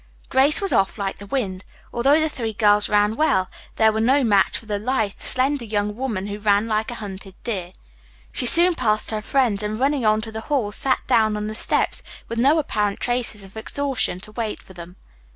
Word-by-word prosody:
Grace 275 +4 +4
was 395 - 0
off 195 +2 +1
like 195 -2 -4
the 200 - -10
wind. 195 -6 -3 0.3
Although 275 +6 +3
the 315 - +1
three 230 -7 -4
girls 210 -1 +3
ran 210 +1 +2
well 205 -11 +1 0.3
they 220 - +3
were 220 - -2
no 265 +5 +3
match 200 -5 +2
for - - -12
the 205 -1 -3
lithe, 220 -3 -2
slender 265 +1 +1
young 210 -2 -2
woman 225 -6 -3
who 205 0 -6
ran 205 0 +2
like 220 +1 -1
a 240 - -6
hunted 195 -3 -9
deer. 190 -7 -4 0.6
She 250 - +1
soon 350 +6 +8
passed 215 -8 0
her 215 -1 -3
friends 235 -4 0
and 210 +1 -4
running 275 0 0
on 215 0 +3
to 220 0 -7
the 220 0 -6
hall 255 -8 0
sat 260 +5 -1
down 215 -2 +2
on 210 - -4
the 215 - -5
steps 215 - +1 0.3
with 230 - -4
no 280 +6 +4
apparent 210 -9 -1
traces 240 -4 0
of 195 +1 -13
exhaustion 260 -3 -1
to 215 - -9
wait 220 -1 -4
for 190 - -16
them. 175 0 -11
220 Hz, 210 wpm, -22 LUFS, 205-255 Hz, 0.6 s, soon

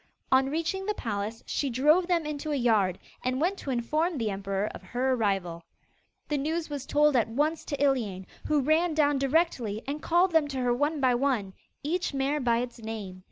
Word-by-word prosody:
On 265 0 +4
reaching 335 +6 -2
the 425 - 0
palace, 215 - -4
she 280 - -1
drove 300 +8 +3
them 345 -3 +1
into 300 0 -4
a - - +1
yard, 215 -8 +2 0.3
and 255 +1 0
went 365 +6 0
to - - -6
inform 305 +7 0
the 225 -4 -1
emperor 195 0 -2
of - - -9
her 260 +2 -1
arrival. 195 -7 -1 0.7
The 295 -2 0
news 315 +2 -2
was 280 -2 -5
told 295 -1 +3
at 235 -3 +3
once 300 +7 0
to 285 - -3
Iliane, 230 -10 0 0.2
who 300 -2 +3
ran 315 +4 +2
down 290 -2 +3
directly 270 -7 0
and 290 +2 -4
called 350 +2 +3
them 320 -3 +3
to 275 -2 -5
her 250 -1 +1
one 290 +4 0
by 255 -2 +4
one, 240 -7 0 0.3
each 330 0 -1
mare 275 +2 0
by 235 -3 +2
its 245 -1 -8
name. 215 -5 -6
270 Hz, 200 wpm, -28 LUFS, 230-305 Hz, 0.7 s, On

